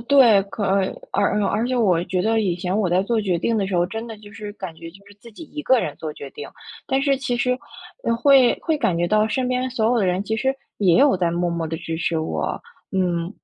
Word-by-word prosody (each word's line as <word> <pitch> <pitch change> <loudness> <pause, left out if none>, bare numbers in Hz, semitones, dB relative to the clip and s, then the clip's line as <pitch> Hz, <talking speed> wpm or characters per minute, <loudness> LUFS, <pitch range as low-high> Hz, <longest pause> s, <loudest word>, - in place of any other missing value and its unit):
对， 240 -8 +6
可 205 +1 -5
而 195 0 +2 0.3
而 - - +2
而 205 - +1
而 225 +4 0
且 255 - 0
我 185 -8 +3
觉 180 0 -1
得 225 +1 +2
以 185 -5 0
前 180 +2 -2
我 210 -4 +1
在 180 +2 +2
做 225 +2 0
决 185 -4 0
定 230 - 0
的 195 - 0
时 190 -2 -2
候， 175 - +3
真 225 +5 -5
的 225 - -8
就 205 -1 -14
是 210 0 -7
感 190 -6 -7
觉 165 +1 -10
就 195 +3 -18
是 205 - -16
自 235 - -13
己 225 - -12
一 300 - -4
个 260 -3 +3
人 150 - -2
做 155 - -5
决 140 -2 -9
定， 145 - -8 0.4
但 265 - +1
是 275 -2 +2
其 250 -2 -2
实， 250 +1 0 0.5
呃， 230 - +1
会 265 -1 +5
会 320 -2 0
感 215 -11 +1
觉 175 +1 +1
到 215 +2 +2
身 255 +2 -1
边 255 +1 0
所 240 -3 -2
有 240 0 +2
的 195 - +1
人 180 +3 0
其 220 - -2
实 265 +2 +1 0.2
也 185 -5 +4
有 275 +1 +5
在 175 -2 +1
默 175 +1 -1
默 170 -1 -2
地 160 - -3
支 160 0 -5
持 165 -1 0
我， 160 - -2 0.3
嗯， 175 -2 0
205 Hz, 285 characters per minute, -22 LUFS, 175-240 Hz, 0.5 s, 对